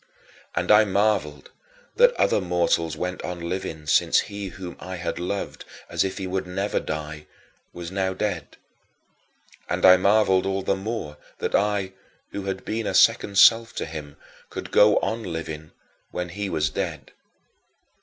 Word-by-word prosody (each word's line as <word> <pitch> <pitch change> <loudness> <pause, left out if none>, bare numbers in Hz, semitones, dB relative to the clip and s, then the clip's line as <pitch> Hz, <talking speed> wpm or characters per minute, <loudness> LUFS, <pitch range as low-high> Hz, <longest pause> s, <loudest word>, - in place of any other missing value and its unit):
And - - +1
I 105 +1 +8
marveled 100 -7 0 0.5
that - - +6
other - - +2
mortals 85 -3 0
went 90 +3 -3
on 90 -1 -5
living 85 -4 -4
since 75 - +4
he 100 -1 -6
whom 90 -1 -8
I 95 0 -6
had 85 -1 -4
loved 95 +3 -4 0.3
as - - +1
if 95 +1 -3
he 95 - -4
would 95 0 -3
never 95 +3 -1
die 75 0 -6 0.4
was 85 0 -7
now 95 -1 -1
dead. 100 -4 -3 1.1
And - - +1
I 90 0 +9
marveled 95 -1 +3
all 95 0 -1
the 100 - +1
more 95 -7 -5 0.2
that - - -3
I, 100 -2 +1 0.4
who 100 - -5
had 95 -1 -4
been 110 0 -2
a - - -2
second 100 - +4
self 115 +2 +6
to - - -2
him, 75 -2 -8 0.3
could - - -7
go 105 0 +6
on 115 +1 -2
living 80 -4 -6 0.4
when 90 0 -4
he 100 +3 -4
was 80 -3 0
dead. 85 -7 -4
95 Hz, 160 wpm, -24 LUFS, 85-100 Hz, 1.1 s, I